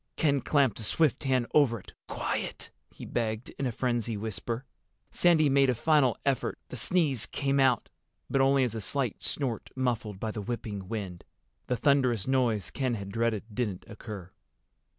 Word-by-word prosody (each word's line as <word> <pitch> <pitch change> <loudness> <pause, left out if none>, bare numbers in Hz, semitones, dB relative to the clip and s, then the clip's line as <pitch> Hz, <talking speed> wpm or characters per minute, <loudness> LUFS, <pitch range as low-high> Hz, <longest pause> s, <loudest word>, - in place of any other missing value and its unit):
Ken 140 -3 +2
clamped 140 -6 +2
a - - -5
swift 150 +5 +1
hand 130 -2 +2
over 130 -7 +4
it. - - -15
"Quiet!" - - -3 0.2
he - - -10
begged, 110 -1 -2
in 135 - 0
a - - -1
frenzied 120 -2 -1
whisper. 115 +4 -4 0.5
Sandy 165 -3 +4
made 135 -1 +4
a 125 - +2
final 145 -1 +3
effort. 135 -2 0
The - - -6
sneeze 140 - +1
came, 140 0 0
but 135 +1 0
only 135 0 +4
as 120 -4 -1
a 110 - -4
slight 130 0 -2
snort 125 -7 -2
muffled 115 -6 -1
by 110 +1 -2
the 105 - -5
whipping 105 -3 -4
wind. 95 -5 -5 0.4
The 125 - 0
thunderous 130 -7 +3
noise 125 -6 +1
Ken 130 -4 -1
had 100 -2 -6
dreaded 115 -1 0
didn't 105 -6 -2
occur. 105 -4 -8
120 Hz, 165 wpm, -29 LUFS, 110-135 Hz, 0.5 s, over